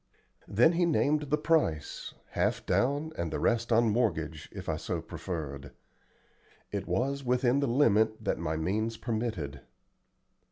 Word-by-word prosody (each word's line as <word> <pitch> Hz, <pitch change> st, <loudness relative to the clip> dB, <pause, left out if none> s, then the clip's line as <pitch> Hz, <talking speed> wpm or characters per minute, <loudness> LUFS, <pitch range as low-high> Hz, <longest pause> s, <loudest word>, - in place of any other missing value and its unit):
Then 120 Hz, +11 st, +5 dB
he 175 Hz, 0 st, +2 dB
named 150 Hz, -2 st, +1 dB
the 150 Hz, -, +3 dB
price, 150 Hz, -, 0 dB, 0.2 s
half -, -, 0 dB
down 145 Hz, +5 st, +1 dB
and 85 Hz, -2 st, -2 dB
the -, -, -2 dB
rest 115 Hz, 0 st, +1 dB
on 115 Hz, +1 st, +5 dB
mortgage, 80 Hz, -, -1 dB
if -, -, -8 dB
I -, -, 0 dB
so -, -, -3 dB
preferred. 70 Hz, -6 st, -6 dB, 1.0 s
It -, -, -3 dB
was 140 Hz, +2 st, 0 dB
within 125 Hz, +1 st, +2 dB
the 140 Hz, -, +1 dB
limit 110 Hz, -4 st, +3 dB
that 100 Hz, -, 0 dB
my 80 Hz, -1 st, -2 dB
means 110 Hz, +7 st, -1 dB
permitted. 110 Hz, -, -3 dB
115 Hz, 145 wpm, -30 LUFS, 85-140 Hz, 1.0 s, Then